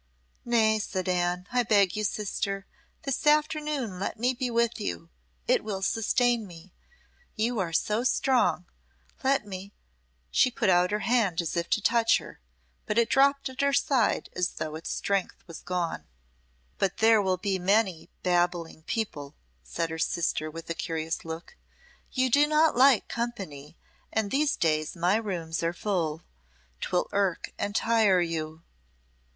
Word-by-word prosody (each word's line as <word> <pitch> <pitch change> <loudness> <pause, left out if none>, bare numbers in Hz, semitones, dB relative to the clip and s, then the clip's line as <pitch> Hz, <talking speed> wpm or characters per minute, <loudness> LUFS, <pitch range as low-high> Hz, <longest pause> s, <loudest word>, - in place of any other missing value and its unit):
"Nay," 220 -2 +3
said 185 -3 -3
Anne; 180 0 0
"I 250 0 +3
beg 205 -5 +3
you, 215 - -2
sister, 200 -1 -2 0.4
this 275 +2 -2
afternoon 300 -8 +1
let 195 - -3
me 250 +2 +2
be 250 0 -2
with 235 0 +1
you; 85 -1 -5 0.4
it - - +3
will 200 -3 -4
sustain 235 +2 +1
me. 175 +1 -14 0.6
You 230 +1 0
are 175 -3 -1
so 210 +7 0
strong 255 -7 +2 0.6
let 270 -4 +2
me 195 0 -8 0.3
" - - -42
She - - +4
put 235 -6 +1
out 180 0 +4
her 210 0 -1
hand 225 -8 +1
as 170 -2 -2
if 170 0 -2
to 215 - +1
touch 230 -1 +4
her, - - -11 0.5
but 210 - -1
it 235 -1 +3
dropped 275 +1 +3
at 260 +1 -5
her 280 0 +2
side 275 -5 +1
as 180 0 0
though 155 - -4
its 160 +2 -6
strength 200 -2 -2
was 165 -3 -9
gone. 180 -2 -3 0.7
"But 195 - 0
there 220 -1 +5
will 190 -2 +1
be 190 +1 -1
many 190 -2 +1
babbling 175 -2 0
people," 155 - -3 0.3
said 65 - -3
her 160 - -5
sister, 160 -2 -1
with 165 +1 -9
a 170 - -2
curious 160 -1 -3
look. 165 - -8 0.6
"You 255 -1 +1
do 290 +4 +5
not 310 +1 +3
like 260 -2 +5
company, 190 -12 -5 0.3
and 215 -2 -1
these 295 +1 +2
days 155 0 0
my 180 +4 +2
rooms 175 -7 -3
are 165 0 0
full. 170 -5 -2 0.6
'Twill 180 - -1
irk 195 -3 -1
and 205 0 -2
tire 220 -5 +3
you." 160 -1 -3
195 Hz, 160 wpm, -27 LUFS, 170-235 Hz, 0.7 s, there